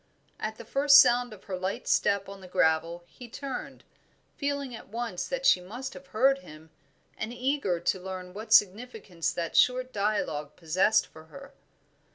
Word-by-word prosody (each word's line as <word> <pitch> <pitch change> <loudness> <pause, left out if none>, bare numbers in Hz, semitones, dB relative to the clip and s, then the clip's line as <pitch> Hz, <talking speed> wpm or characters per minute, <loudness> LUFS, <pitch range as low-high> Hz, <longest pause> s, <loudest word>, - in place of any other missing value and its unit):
At 215 0 -4
the 235 - -10
first 275 +4 +6
sound 245 0 +4
of 210 -3 -12
her 195 - -5
light 185 +2 -4
step 200 -1 +2
on 195 0 -10
the 185 - -11
gravel 165 0 +1
he 240 +7 -13
turned, 270 +2 -7 0.5
feeling 280 -3 -3
at 225 - -10
once 230 -4 -4
that - - -3
she 180 - +5
must 245 +9 -7
have 185 0 -12
heard, 265 +8 +2
and 155 - -14 0.6
eager 250 -8 -1
to 175 +2 0
learn 185 -1 -7
what 215 +2 -9
significance 205 -4 +2
that 170 -1 -4
short 255 0 +3
dialogue 200 -8 -2
possessed 185 +6 +2
for 155 0 -15
her. 275 +11 -13
210 Hz, 165 wpm, -28 LUFS, 180-250 Hz, 0.6 s, first